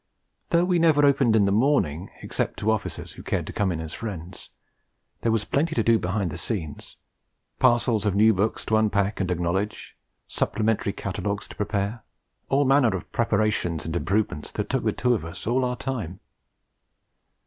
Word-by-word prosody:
Though 170 +1 +3
we 180 -1 +2
never 155 -3 +5
opened 135 -5 +4
in 105 -2 +4
the 100 - +2
morning, 100 - +1
except - - -2
to 110 +2 +1
officers 110 - -3
who - - -10
cared - - -2
to - - -7
come 100 -3 0
in 80 - -3
as 80 -1 -6
friends, 90 -5 -7 0.7
there 115 - +1
was 110 -2 +1
plenty 160 +3 0
to 115 - +2
do 115 0 +4
behind 95 -1 -1
the - - -6
scenes 80 -11 -5 0.6
parcels 120 -3 +3
of 105 -2 0
new 110 +2 +5
books 100 +3 -1
to 110 - +2
unpack 105 -2 +1
and 95 -2 -1
acknowledge, 90 +4 -2 0.3
supplementary 110 -2 0
catalogues 100 +1 -3
to - - -10
prepare 105 +2 -2 0.5
all 140 +1 +3
manner 135 -3 +4
of - - -11
preparations 105 -7 0
and 80 +1 -4
improvements 95 -4 -1
that - - -3
took - - 0
the - - +3
two 125 0 +1
of 110 - -1
us 85 0 -8
all 125 +4 +1
our 125 0 -1
time. 110 -11 -4
105 Hz, 180 wpm, -25 LUFS, 95-120 Hz, 0.7 s, never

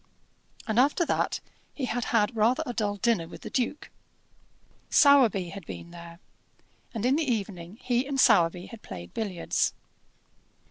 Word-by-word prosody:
And 220 +1 +1
after 290 +6 +3
that - - 0 0.4
he 275 - -2
had 245 0 -2
had 225 +1 +1
rather 225 +4 +2
a 245 - -4
dull 210 -3 -1
dinner 205 -5 0
with - - -11
the - - -8
duke. 255 +3 -2 1.0
Sowerby 245 - +5
had 195 +1 -8
been 170 - -8
there, 170 -1 -11 0.7
and 225 -1 -3
in 265 +3 +3
the 305 -5 0
evening 195 -3 -4
he 250 +1 0
and 275 -1 -2
Sowerby 180 -7 +4
had 230 0 -11
played 90 -1 -9
billiards. 190 -6 -1
220 Hz, 150 wpm, -27 LUFS, 180-250 Hz, 1.0 s, Sowerby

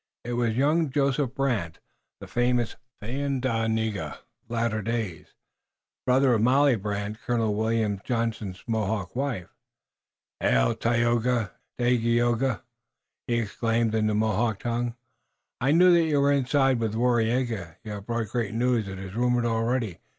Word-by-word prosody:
It 120 - -4
was 120 -2 0
young 150 +3 +2
Joseph 135 -1 0
Brant, 110 -12 -1 0.4
the - - -7
famous 120 -1 0 0.3
Thayendanega 115 - -1
of - - -14 0.3
later 115 -2 0
days, 110 -5 -3
the - - -31 0.7
brother 130 0 +4
of 110 - +2
Molly 135 +3 +4
Brant, 105 +1 -4
Colonel 115 -3 0
William 110 -2 0
Johnson's 115 -6 -2
Mohawk 110 -4 -2
wife. 125 -9 -2 0.9
"Hail, - - +3
Tayoga! 120 -2 +1 0.3
Hail, 120 0 +2 0.4
Dagaeoga!" 130 -1 -1 0.6
he 120 - +1
exclaimed 115 0 0
in 110 -1 +2
the 105 - +1
Mohawk 110 0 +1
tongue. 120 0 -2 0.6
"I 130 - +1
knew 180 +3 +6
that 170 -1 +4
you 150 -3 +2
were 140 0 +4
inside 135 -2 +2
with 110 -2 -1
Waraiyageh! 115 -6 0
You 110 - -7
have 100 -1 -7
brought 115 -3 -2
great 115 -2 -2
news, 120 -3 +1
it 95 -1 -6
is 95 0 -8
rumored 120 +1 +1
already! 115 -3 0
115 Hz, 145 wpm, -26 LUFS, 110-125 Hz, 0.9 s, knew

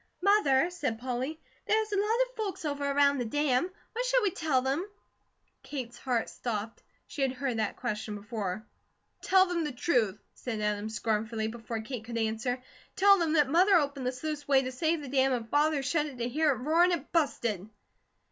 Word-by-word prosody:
"Mother," 355 -6 +4
said 280 -10 -2
Polly, 255 +6 -3 0.3
"there 435 - +4
is 435 -1 -3
a 400 - +1
lot 440 +4 +2
of - - -23
folks 405 -6 -4
over 285 -1 -1
around 280 0 +3
the 245 - -1
dam. 290 +5 +1 0.2
What 480 +2 -1
shall - - +3
we 400 - +2
tell 295 -7 +1
them?" 275 +6 0 0.8
Kate's 245 -4 -6
heart 245 -4 0
stopped. 225 -2 -4 0.2
She 285 - -6
had 265 -1 +2
heard 260 -2 -2
that 215 - -1
question 215 -3 -3
before. 205 -1 -4 0.6
"Tell 375 0 +5
them 350 -2 -1
the 300 - -2
truth," 240 - +1 0.2
said 230 -4 -5
Adam 210 0 -1
scornfully, 220 0 -1
before 225 0 -5
Kate 230 0 -6
could 235 +1 -5
answer. 225 +3 -1 0.4
"Tell 395 0 +6
them 325 -2 +1
that 295 -3 +4
Mother 365 +7 +5
opened 280 -5 +1
the - - +1
sluiceway 285 0 0
to 255 - -3
save 315 +5 0
the - - -7
dam 265 0 +2
and 235 -2 -2
Father 295 0 +2
shut 300 +2 +1
it 275 -4 -9
to 240 0 -2
hear 305 +5 +2
it 280 - +3
roar, 310 +8 +3
and 360 0 +4
it 300 -4 -4
busted!" 235 - 0
270 Hz, 195 wpm, -29 LUFS, 235-320 Hz, 0.8 s, Tell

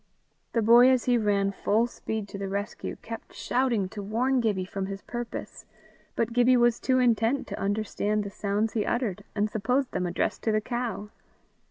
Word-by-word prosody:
The 230 - +2
boy 240 +3 +7
as 255 -2 +3
he 245 - +3
ran 200 -2 +1
full 210 +3 +1
speed 220 -3 -5
to 200 - -7
the 195 -1 -3
rescue, 200 +1 -4
kept 230 0 -8
shouting 240 -6 0
to 205 +1 -7
warn 245 +6 +1
Gibbie 205 -5 0
from 190 0 -4
his 195 0 -6
purpose, 240 -1 -6 0.5
but 230 0 -1
Gibbie 245 +1 +5
was 240 -1 +3
too 260 -1 +2
intent 240 +2 +2
to - - -5
understand 210 +1 -1
the 200 - -6
sounds 205 +2 -1
he 220 - +1
uttered, 235 -6 -1
and 210 0 +1
supposed 250 +6 0
them 180 - -1
addressed 175 - -1
to 220 - +1
the 215 - +2
cow. 230 -3 -4
220 Hz, 185 wpm, -27 LUFS, 200-240 Hz, 0.5 s, boy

